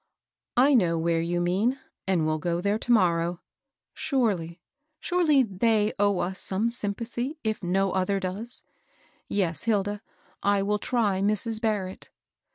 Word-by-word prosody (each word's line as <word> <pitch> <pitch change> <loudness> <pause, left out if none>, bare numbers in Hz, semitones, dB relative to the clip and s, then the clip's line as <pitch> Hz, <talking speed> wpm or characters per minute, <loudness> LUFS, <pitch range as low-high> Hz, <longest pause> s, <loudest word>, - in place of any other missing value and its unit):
"I 270 +4 +5
know 175 -9 +3
where 165 0 +1
you 175 +1 -1
mean, 195 +9 +1 0.3
and 180 -4 +2
will 155 0 0
go 170 +2 -1
there 200 +4 0
to 245 - -2
morrow. 175 -5 +2 0.5
Surely, 195 - -1 0.4
surely 315 -5 +3
they 215 +1 +1
owe 205 -1 +3
us 185 +1 -2
some 210 +5 0
sym 205 -4 -1
pathy, 240 +6 -4
if 220 -1 -2
no 190 +1 +1
other 190 +1 0
does 195 +6 -5
I - - -43 0.6
Yes, 180 -3 -1
Hilda, 205 -2 0 0.4
I 200 0 +2
will 210 +1 0
try 205 -5 0
Mrs. 215 +2 +2
Barrett." 205 -5 -2
200 Hz, 150 wpm, -26 LUFS, 180-225 Hz, 0.6 s, I